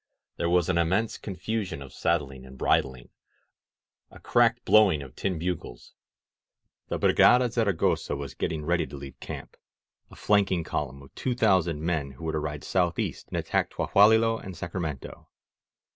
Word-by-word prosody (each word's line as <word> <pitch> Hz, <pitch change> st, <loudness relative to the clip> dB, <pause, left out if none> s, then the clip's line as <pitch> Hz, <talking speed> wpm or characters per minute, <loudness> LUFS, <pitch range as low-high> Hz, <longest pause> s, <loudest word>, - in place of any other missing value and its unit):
There 85 Hz, -, 0 dB
was 90 Hz, -1 st, +3 dB
an 85 Hz, -2 st, +1 dB
immense 95 Hz, +7 st, 0 dB
con 100 Hz, -, -6 dB
fusion 105 Hz, -6 st, -3 dB
of 70 Hz, -2 st, -11 dB
saddling 70 Hz, -6 st, -1 dB
and 65 Hz, 0 st, -13 dB
bridling 65 Hz, -2 st, 0 dB, 0.5 s
— -, -, -57 dB
^a -, -, -14 dB
cracked 120 Hz, 0 st, +2 dB
blowing 95 Hz, -9 st, +5 dB
of 65 Hz, -, -13 dB
tin 95 Hz, -3 st, -2 dB
bugles. 80 Hz, -8 st, -5 dB, 0.9 s
The -, -, -2 dB
Brigada 125 Hz, 0 st, +5 dB
Zavagosa 100 Hz, -, 0 dB
was 70 Hz, -2 st, -6 dB
getting 80 Hz, -2 st, -3 dB
ready 85 Hz, +1 st, +1 dB
to 70 Hz, -, -9 dB
leave 70 Hz, 0 st, -10 dB
camp -, -, -8 dB, 0.3 s
— -, -, -67 dB
a -, -, -14 dB
flanking 95 Hz, -4 st, +2 dB
column 70 Hz, -3 st, -4 dB
of 70 Hz, -, -17 dB
two 125 Hz, -2 st, -2 dB
thousand 90 Hz, -9 st, +2 dB
men 80 Hz, -5 st, -1 dB
who 65 Hz, -, -13 dB
were 80 Hz, -, -1 dB
to 80 Hz, -, -1 dB
ride 75 Hz, -1 st, -5 dB
southeast 90 Hz, -2 st, -1 dB
and -, -, -5 dB
attack -, -, 0 dB
Tlahualilo 110 Hz, +2 st, +3 dB
and 95 Hz, -2 st, -8 dB
Sacramento. 85 Hz, -6 st, -6 dB
85 Hz, 165 wpm, -27 LUFS, 75-100 Hz, 0.9 s, blowing